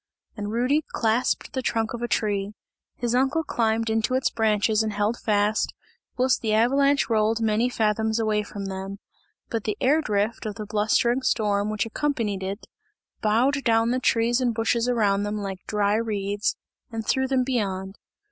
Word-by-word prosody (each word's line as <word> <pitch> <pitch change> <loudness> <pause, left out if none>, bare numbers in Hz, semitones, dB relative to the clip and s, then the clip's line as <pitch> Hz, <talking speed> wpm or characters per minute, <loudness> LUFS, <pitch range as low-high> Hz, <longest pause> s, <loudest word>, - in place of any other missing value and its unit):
And 205 -1 -4
Rudy 255 +7 +1
clasped 230 +6 0
the 260 - -1
trunk 225 -3 -1
of 235 - -5
a 240 - -1
tree; 205 -3 -1 0.4
his 240 -1 -2
uncle 270 +6 +2
climbed 225 -4 0
into 225 +3 +1
its 260 - +1
branches 215 -1 +2
and 220 -1 -1
held 210 +3 0
fast, 210 0 +1 0.4
whilst 255 0 +2
the 215 -2 +1
avalanche 275 +5 +3
rolled 220 0 +2
many 225 +2 +1
fathoms 220 -1 0
away 215 -2 +1
from 205 -1 -7
them. 195 +1 -5 0.5
But 230 -3 -2
the 210 - -2
air 295 +5 +3
drift 215 -2 -1
of 210 - -5
the 215 - -6
blustering 220 +4 +1
storm, 210 -4 +1
which 215 0 -1
accompanied 225 -6 -2
it, 195 +3 -5 0.6
bowed 255 +7 +2
down 225 0 +3
the 255 - +1
trees 240 0 +2
and 240 -3 +1
bushes 230 +2 +1
around 205 -5 +2
them 205 +1 -2
like 195 -2 -4
dry 210 0 +1
reeds 205 -2 -1 0.4
and 225 -1 -4
threw 265 +3 +1
them 260 -1 +2
beyond. 195 -6 -2
220 Hz, 170 wpm, -25 LUFS, 210-240 Hz, 0.6 s, avalanche